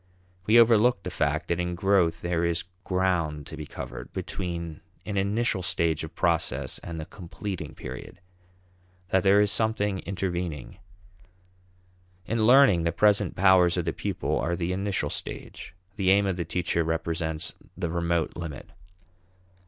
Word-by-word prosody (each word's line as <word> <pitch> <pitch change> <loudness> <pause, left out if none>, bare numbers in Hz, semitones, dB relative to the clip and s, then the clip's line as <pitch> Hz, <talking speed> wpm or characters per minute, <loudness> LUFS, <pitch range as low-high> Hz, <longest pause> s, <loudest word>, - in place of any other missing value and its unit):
We 115 +2 +7
overlook 115 -1 +5
the 90 - -5
fact 80 -1 -1
that 85 - 0
in 90 0 -2
growth 90 -3 +2
there 85 -1 0
is 85 0 0 0.2
ground 90 -6 0
to - - -8
be 75 -1 -7
covered - - -8
between 85 -4 -5 0.2
an 105 - -4
initial 100 +1 +1
stage 85 -3 0
of 80 +1 -8
process 70 -6 0
and 85 -1 -7
the 80 - -5
completing 95 +1 -7
period; 65 +7 -8 0.9
that 95 - +3
there 100 +2 +5
is 105 -1 +3
something 105 -3 0
intervening. 90 -8 -4 1.5
In 110 +1 +1
learning, 125 -9 +6
the 85 - +1
present 105 +1 +3
powers 90 -2 +5
of 85 - -1
the 80 - -1
pupil - - -2
are 85 +7 0
the 85 +1 -2
initial 95 -6 -1
stage; - - -6 0.2
the 95 -3 +2
aim 100 +1 +5
of 95 -2 0
the 85 -1 -3
teacher 85 -1 0
represents 80 -1 -2 0.2
the 90 -3 -2
remote 85 -1 0
limit. 80 -4 -7
90 Hz, 150 wpm, -27 LUFS, 85-100 Hz, 1.5 s, We